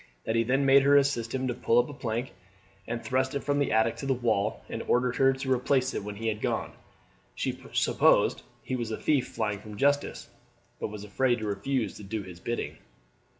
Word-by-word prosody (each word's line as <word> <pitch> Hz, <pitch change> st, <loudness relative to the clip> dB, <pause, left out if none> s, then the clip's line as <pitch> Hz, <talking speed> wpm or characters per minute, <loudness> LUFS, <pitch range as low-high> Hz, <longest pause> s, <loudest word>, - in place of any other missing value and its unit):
That 110 Hz, -, -1 dB
he 115 Hz, -, +4 dB
then 135 Hz, +4 st, +1 dB
made 135 Hz, +1 st, +7 dB
her 140 Hz, +1 st, +5 dB
assist 135 Hz, -4 st, +1 dB
him 130 Hz, 0 st, -1 dB
to 125 Hz, -, 0 dB
pull 115 Hz, -1 st, +1 dB
up 120 Hz, 0 st, +4 dB
a 145 Hz, -, -8 dB
plank, 120 Hz, -1 st, -3 dB, 0.5 s
and 115 Hz, 0 st, -4 dB
thrust 130 Hz, +1 st, 0 dB
it 140 Hz, -, -2 dB
from 145 Hz, +1 st, +1 dB
the 145 Hz, -, +1 dB
attic 110 Hz, +1 st, +2 dB
to 135 Hz, -, -5 dB
the 135 Hz, -, +2 dB
wall, 110 Hz, -, 0 dB
and -, -, -5 dB
ordered 125 Hz, 0 st, +2 dB
her 135 Hz, 0 st, +5 dB
to 130 Hz, 0 st, -1 dB
replace 130 Hz, +1 st, +1 dB
it -, -, -3 dB
when 105 Hz, 0 st, -6 dB
he 115 Hz, +2 st, -4 dB
had 110 Hz, -1 st, -1 dB
gone. -, -, -1 dB, 0.6 s
She -, -, -2 dB
supposed -, -, +3 dB, 0.2 s
he 130 Hz, -, -3 dB
was 120 Hz, -3 st, -3 dB
a 110 Hz, -, -3 dB
thief 145 Hz, -5 st, +1 dB
flying 105 Hz, -2 st, -2 dB
from 105 Hz, 0 st, -10 dB
justice, 145 Hz, +2 st, +1 dB, 0.5 s
but -, -, -2 dB
was 105 Hz, -1 st, -8 dB
afraid 120 Hz, +4 st, +1 dB
to 110 Hz, -, -5 dB
refuse 110 Hz, +5 st, -2 dB
to 105 Hz, -, -10 dB
do 105 Hz, +1 st, -4 dB
his 90 Hz, -2 st, -11 dB
bidding. 120 Hz, +6 st, -4 dB
120 Hz, 220 wpm, -28 LUFS, 110-135 Hz, 0.6 s, made